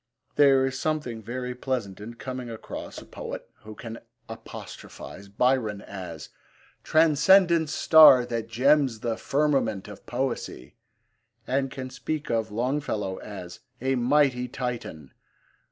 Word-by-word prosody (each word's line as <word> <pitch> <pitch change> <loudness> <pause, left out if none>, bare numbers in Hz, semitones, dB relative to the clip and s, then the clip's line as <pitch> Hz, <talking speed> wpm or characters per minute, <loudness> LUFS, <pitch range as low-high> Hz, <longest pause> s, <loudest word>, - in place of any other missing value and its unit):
There 135 -2 +5
is 130 0 -3
something 150 -8 -2
very 125 +3 -4
pleasant 125 -6 -3
in 115 +3 -8
coming 125 0 -6
across 115 -1 -8
a - - -9
poet - - -7
who 110 0 -11
can 115 0 -8 0.3
apostrophise 105 -3 -10
Byron 110 0 +1
as 90 -6 -8 0.5
transcendent 165 +1 +4
star 150 -6 +7
That 115 -2 -3
gems 130 0 +2
the 115 -2 -1
firmament 135 -8 0
of 105 -1 -12
poesy, 125 - -3 0.7
and 135 +1 0
can 130 -1 -7
speak 150 +3 -4
of 115 -1 0
Longfellow 110 -4 -2
as 90 -4 -9 0.2
a 130 +2 0
'mighty 130 0 +2
Titan.' 120 - -5
125 Hz, 120 wpm, -26 LUFS, 110-135 Hz, 0.7 s, star